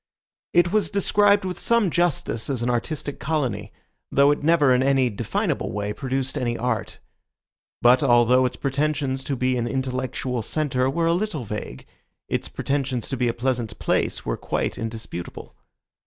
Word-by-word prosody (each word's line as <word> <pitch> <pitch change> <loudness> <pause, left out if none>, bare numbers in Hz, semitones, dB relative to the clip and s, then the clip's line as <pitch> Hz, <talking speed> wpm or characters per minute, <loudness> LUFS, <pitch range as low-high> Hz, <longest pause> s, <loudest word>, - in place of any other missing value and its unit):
It 175 0 +4
was 215 0 +2
described 200 0 +3
with 185 -1 -4
some 230 -6 +2
justice 150 -10 0
as 130 -4 -1
an 125 - +1
artistic 140 +4 -3
colony, 125 -9 -2 0.4
though 140 +1 +5
it 145 - -1
never 150 -4 +4
in 125 - +3
any 135 -2 +3
definable 100 - -2
way 105 0 -3
produced 135 +2 -2
any 120 -2 -1
art. 115 -4 -2 0.9
But 125 +3 +6
although 125 -1 +4
its 125 - -6
pretensions 140 -1 -1
to 140 - -1
be 130 0 +1
an 120 -1 -1
intellectual 130 -1 -2
centre 130 0 0
were 165 +4 0
a 165 - +3
little 180 - -2
vague, 105 - -6 0.4
its - - -2
pretensions 135 -4 -2
to - - -1
be 125 -1 0
a 115 - +1
pleasant 120 -3 -2
place - - 0
were - - -1
quite - - -2
indisputable. 110 -6 -7
130 Hz, 160 wpm, -24 LUFS, 120-150 Hz, 0.9 s, But